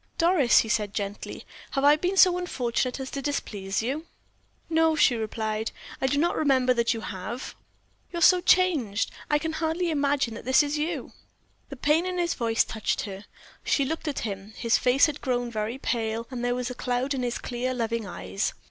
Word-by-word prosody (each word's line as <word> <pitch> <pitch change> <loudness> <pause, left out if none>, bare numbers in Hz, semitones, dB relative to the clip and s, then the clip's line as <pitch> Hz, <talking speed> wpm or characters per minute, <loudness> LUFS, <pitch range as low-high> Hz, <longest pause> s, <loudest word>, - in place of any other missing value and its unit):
"Doris," 330 -7 +5
he - - -5
said, 210 -2 -1
gently, 205 -1 -5 0.3
"have 275 - 0
I 290 +1 +7
been 360 +5 -1
so 360 -1 +6
unfortunate 255 -6 -1
as 265 0 -5
to 275 - -4
displease 205 -8 -2
you?" 290 +7 -3 0.6
"No," 320 -1 +3
she 295 -5 +4
replied. 220 0 -2 0.3
"I 265 - +2
do 285 - 0
not 340 +4 +2
remember 260 -4 +3
that 235 -1 +1
you 225 -2 -2
have." 205 +6 -6 0.6
"You're 340 -1 -1
so 365 +1 +6
changed, 315 - +2 0.2
I 295 - +4
can 320 +1 -3
hardly 325 +2 -1
imagine 280 -5 +1
that - - -8
this 260 +3 +5
is 290 +1 -2
you." 310 +3 -3 0.6
The 275 - -7
pain 300 +6 +2
in 365 0 -3
his 345 -1 +1
voice 230 -2 +1
touched 220 -2 -2
her. 200 0 -7 0.4
She 280 - +2
looked 320 +3 -4
at 290 - -2
him; 200 0 -6
his 230 0 +2
face 255 +3 +4
had 300 -2 -3
grown 245 -2 -1
very 220 +2 -3
pale, 230 -3 -2
and 245 -2 -4
there 245 0 +1
was 250 0 -3
a - - -4
cloud 250 +2 -1
in 265 - -2
his 245 -1 -1
clear, 245 +1 -3
loving 230 -3 -2
eyes. 95 - -3
255 Hz, 195 wpm, -26 LUFS, 225-300 Hz, 0.6 s, I